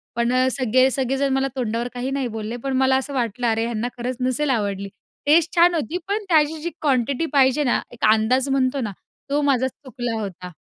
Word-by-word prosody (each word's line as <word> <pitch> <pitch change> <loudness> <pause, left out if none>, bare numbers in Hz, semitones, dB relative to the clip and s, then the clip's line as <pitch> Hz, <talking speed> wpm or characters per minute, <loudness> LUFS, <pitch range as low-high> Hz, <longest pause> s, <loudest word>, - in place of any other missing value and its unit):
पण 235 +1 +1 0.2
सगळे 255 +1 +3
सगळे 265 0 -1
जण 275 -1 +1
मला 270 0 +1
तोंडावर 235 -1 -2
काही 250 +2 -3
नाही 270 -2 -1
बोलले 220 +3 -4
पण 265 - -1
मला 265 0 +3
असं 275 +1 -4
वाटलं 240 -1 -1
अरे, 225 0 +1
ह्यांना 235 0 -2
खरंच 245 +1 -3
नसेल 255 +3 0
आवडली. 200 -4 -1 0.4
टेस्ट 320 +4 +3
छान 345 +1 +5
होती 325 +2 -2
पण 415 +1 -1
त्याची 310 -1 +3
जी 345 - -2
क्वांटिटी 270 +1 +1
पाहिजे 270 +1 +4
ना, 250 - +1
एक 235 -2 -2
अंदाज 250 +5 +1
म्हणतो 270 0 +1
ना 210 -3 -3 0.4
तो 290 +1 +1
माझा 260 -3 +2
चुकला 245 -4 -5
होता. 185 -2 -7
255 Hz, 195 wpm, -22 LUFS, 235-280 Hz, 0.4 s, छान